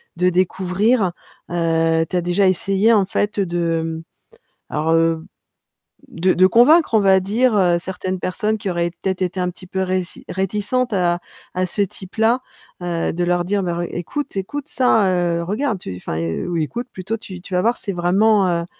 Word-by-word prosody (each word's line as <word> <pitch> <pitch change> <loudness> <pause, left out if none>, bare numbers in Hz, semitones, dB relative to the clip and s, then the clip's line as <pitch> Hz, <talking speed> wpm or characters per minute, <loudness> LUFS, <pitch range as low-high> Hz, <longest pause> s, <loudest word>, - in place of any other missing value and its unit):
de 180 0 +2
découvrir? 185 +4 +1 0.4
Heu, 165 -1 +2
tu 185 - -4
as 180 - +2
déjà 175 +3 +2
essayé 195 +4 +2
en 205 -3 +4
fait 205 +2 -1
de, 170 -3 0
mmh, 160 0 -4 0.7
alors, 155 +2 0
heu, 165 0 +2 0.8
de 185 +2 +1
de 185 - +5
convaincre, 280 - +5
on 220 - +6
va 195 -2 +5
dire, 215 +4 +1
heu, 175 -3 +3
certaines 185 +1 -4
personnes 215 +4 -1
qui 195 - -3
auraient 170 -1 -1
peut-être 190 -1 -1
été 185 +1 -2
un 180 0 0
petit 180 +1 -11
peu 190 +1 -3
réci 185 -1 -2
réticentes 210 +6 -1
à 175 -2 +1 0.4
à 185 0 +1
ce 185 +3 -2
type-là, 220 +5 0 0.4
heu, 170 -1 -1
de 175 +2 -2
leur 175 0 +1
dire: 200 +2 0
«Bah 175 -2 -2
re - - 0
écoute 240 - -5
écoute, 245 +9 -4
ça, 225 -6 +3
heu, 175 -2 +1
regarde, 215 +4 -1
tu 95 - -6
enfin, 80 -3 -4
heu, 85 0 -3
oui, 170 -2 -1
écoute 240 +10 -5
plutôt, 190 +5 -4
tu 185 -5 -10
tu 185 0 -5
vas 180 - +3
voir, 235 +4 +1
c'est 200 - -4
vraiment, 195 +3 +3
heu, 170 -1 0
185 Hz, 190 wpm, -20 LUFS, 175-205 Hz, 0.8 s, on